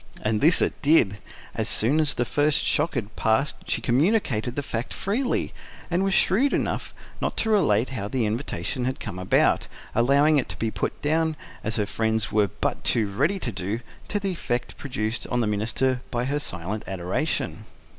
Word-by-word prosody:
And 110 Hz, 0 st, +1 dB
this 160 Hz, +4 st, +6 dB
it -, -, -2 dB
did. 125 Hz, -10 st, +4 dB, 0.3 s
As -, -, -1 dB
soon 130 Hz, +8 st, +3 dB
as 150 Hz, -3 st, +3 dB
the 120 Hz, -, 0 dB
first 145 Hz, +2 st, +2 dB
shock 150 Hz, +2 st, +1 dB
had 110 Hz, -3 st, -3 dB
passed 115 Hz, +7 st, +1 dB
she -, -, 0 dB
communicated 125 Hz, -, +1 dB
the 145 Hz, -, -2 dB
fact 120 Hz, -2 st, -4 dB
freely, 240 Hz, +7 st, -1 dB, 0.4 s
and 175 Hz, +3 st, +2 dB
was 195 Hz, -1 st, +1 dB
shrewd 255 Hz, +10 st, +3 dB
enough -, -, -1 dB, 0.3 s
not -, -, -2 dB
to 220 Hz, -, +1 dB
relate 130 Hz, -, +3 dB
how 115 Hz, -7 st, -3 dB
the 120 Hz, +1 st, 0 dB
invitation 125 Hz, +3 st, -2 dB
had 130 Hz, +1 st, -2 dB
come 95 Hz, -5 st, -6 dB
about, 95 Hz, -, +2 dB, 0.3 s
allowing 140 Hz, +6 st, +4 dB
it 130 Hz, -, -3 dB
to -, -, -6 dB
be 115 Hz, -1 st, -1 dB
put 100 Hz, -, -3 dB
down, 160 Hz, +1 st, +1 dB, 0.3 s
as 110 Hz, 0 st, -1 dB
her 105 Hz, -, +1 dB
friends 110 Hz, +1 st, 0 dB
were 105 Hz, -1 st, +3 dB
but -, -, -3 dB
too 105 Hz, -4 st, +1 dB
ready 145 Hz, -, +1 dB
to 130 Hz, -10 st, -3 dB
do, 100 Hz, +3 st, -3 dB, 0.3 s
to 205 Hz, -, -1 dB
the 195 Hz, -1 st, -1 dB
effect 120 Hz, -8 st, -3 dB
produced 115 Hz, -4 st, -3 dB
on 125 Hz, -, 0 dB
the 120 Hz, -, +2 dB
minister 115 Hz, +5 st, 0 dB
by 120 Hz, 0 st, -1 dB
her 145 Hz, +3 st, 0 dB
silent 100 Hz, -, -4 dB
adoration. 90 Hz, -2 st, -2 dB
125 Hz, 185 wpm, -25 LUFS, 110-150 Hz, 0.4 s, this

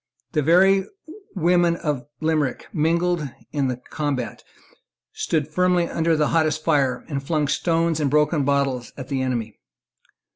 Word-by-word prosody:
The 155 Hz, -, +1 dB
very 190 Hz, +5 st, +4 dB, 0.5 s
women 175 Hz, -1 st, +3 dB
of 150 Hz, -7 st, -3 dB
Limerick 155 Hz, -4 st, 0 dB
mingled, 165 Hz, -1 st, +1 dB, 0.2 s
in 140 Hz, -3 st, 0 dB
the 125 Hz, -1 st, -2 dB
combat, 130 Hz, -3 st, -4 dB, 0.7 s
stood 155 Hz, -3 st, -1 dB
firmly 180 Hz, +1 st, +2 dB
under 165 Hz, -1 st, +1 dB
the 150 Hz, -, +2 dB
hottest 155 Hz, -1 st, +1 dB
fire, 140 Hz, -6 st, +1 dB
and 140 Hz, -3 st, -3 dB
flung 155 Hz, 0 st, 0 dB
stones 165 Hz, +1 st, +1 dB
and 145 Hz, -2 st, +1 dB
broken 150 Hz, +1 st, +2 dB
bottles 135 Hz, -3 st, 0 dB
at 130 Hz, -2 st, -8 dB
the 135 Hz, -1 st, -1 dB
enemy. 120 Hz, -4 st, -3 dB
155 Hz, 140 wpm, -23 LUFS, 140-170 Hz, 0.7 s, very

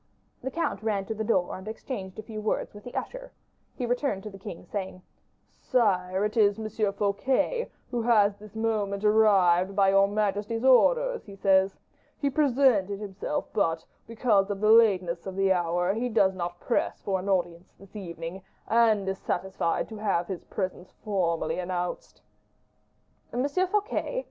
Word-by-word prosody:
The 265 Hz, -, -3 dB
count 285 Hz, -, -2 dB
ran 210 Hz, -3 st, -1 dB
to 220 Hz, -, -3 dB
the 220 Hz, 0 st, -3 dB
door 190 Hz, -5 st, +1 dB
and 190 Hz, +2 st, -10 dB
exchanged 215 Hz, -4 st, -6 dB
a 215 Hz, -, -6 dB
few 215 Hz, -1 st, -7 dB
words 215 Hz, -, -2 dB
with 205 Hz, 0 st, -12 dB
the 245 Hz, -, -9 dB
usher; -, -, -5 dB, 0.4 s
he 250 Hz, -, -3 dB
returned 245 Hz, -5 st, -1 dB
to 215 Hz, -, -7 dB
the 195 Hz, -, -12 dB
king, 180 Hz, -3 st, -8 dB
saying, 190 Hz, -2 st, -5 dB, 0.5 s
"Sire, 190 Hz, -6 st, +1 dB
it 210 Hz, -, -3 dB
is 205 Hz, -2 st, +4 dB
M. 215 Hz, -1 st, -1 dB
Fouquet 260 Hz, -, 0 dB, 0.2 s
who 240 Hz, -2 st, -1 dB
has 215 Hz, -3 st, +4 dB
this 210 Hz, 0 st, -14 dB
moment 215 Hz, -3 st, -1 dB
arrived, 195 Hz, -4 st, +4 dB
by 195 Hz, -1 st, +4 dB
your 195 Hz, 0 st, +5 dB
majesty's 210 Hz, +2 st, -1 dB
orders, -, -, +4 dB
he 200 Hz, -, -11 dB
says. 190 Hz, 0 st, +3 dB, 0.4 s
He 280 Hz, -1 st, 0 dB
presented 255 Hz, -9 st, +2 dB
himself, 210 Hz, +8 st, -4 dB
but, 165 Hz, -5 st, 0 dB, 0.2 s
because 220 Hz, -4 st, +2 dB
of 200 Hz, -1 st, -3 dB
the 215 Hz, +1 st, +4 dB
lateness 185 Hz, -6 st, +4 dB
of 190 Hz, -, -5 dB
the 195 Hz, 0 st, +3 dB
hour, 175 Hz, +1 st, 0 dB
he 240 Hz, +4 st, -2 dB
does 205 Hz, -4 st, +3 dB
not 175 Hz, -1 st, -5 dB
press 240 Hz, -, -1 dB
for 190 Hz, -1 st, 0 dB
an 190 Hz, +2 st, -5 dB
audience 175 Hz, -2 st, -1 dB
this 195 Hz, +1 st, -17 dB
evening, 170 Hz, -1 st, -6 dB, 0.3 s
and 220 Hz, -4 st, +3 dB
is 190 Hz, 0 st, -2 dB
satisfied 190 Hz, -3 st, -1 dB
to 220 Hz, -, -8 dB
have 195 Hz, -5 st, 0 dB
his 185 Hz, -1 st, -6 dB
presence 185 Hz, -2 st, -4 dB
here -, -, -35 dB
formally 170 Hz, -5 st, -1 dB
announced." 180 Hz, -1 st, -4 dB, 1.1 s
"M. 250 Hz, +3 st, 0 dB
Fouquet! 410 Hz, -, -1 dB
205 Hz, 170 wpm, -27 LUFS, 190-225 Hz, 1.1 s, your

